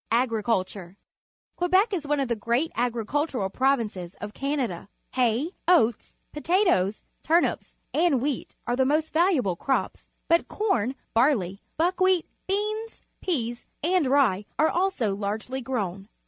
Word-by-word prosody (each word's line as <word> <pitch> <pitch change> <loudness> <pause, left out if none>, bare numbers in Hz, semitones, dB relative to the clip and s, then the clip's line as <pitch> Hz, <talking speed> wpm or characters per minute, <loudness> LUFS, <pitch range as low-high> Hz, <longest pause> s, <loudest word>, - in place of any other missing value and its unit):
Agriculture. 215 -6 0 0.3
— - - -60
Quebec 375 +5 +3
is 320 -6 -2
one 295 0 +1
of 270 - 0
the 235 - 0
great 235 +8 0
agricultural 240 -1 -1
provinces 220 -10 0
of 210 0 -7
Canada. 265 - -2 0.2
Ha}% 255 - +1
oats^ 240 -11 +3 0.2
potatoes, 300 - +1 0.2
turnips, 335 +2 +1 0.2
and 320 -4 +3
wheat 275 0 -3
are 240 - 0
the 260 - +3
most 305 +4 +1
valuable 315 - +2
crops, 265 +9 -1 0.2
but 335 +1 +3
corn, 270 - 0 0.2
barley, 225 -7 +2 0.2
buckwheat, 365 +1 +2 0.2
beans, 425 +3 -2 0.2
peas, 240 -9 -2 0.2
and 350 -3 +2
rye 255 -8 +3
are 310 +1 +4
also 350 - 0
largely 215 +6 -3
grown. 200 -6 -3
265 Hz, 130 wpm, -26 LUFS, 220-330 Hz, 0.3 s, are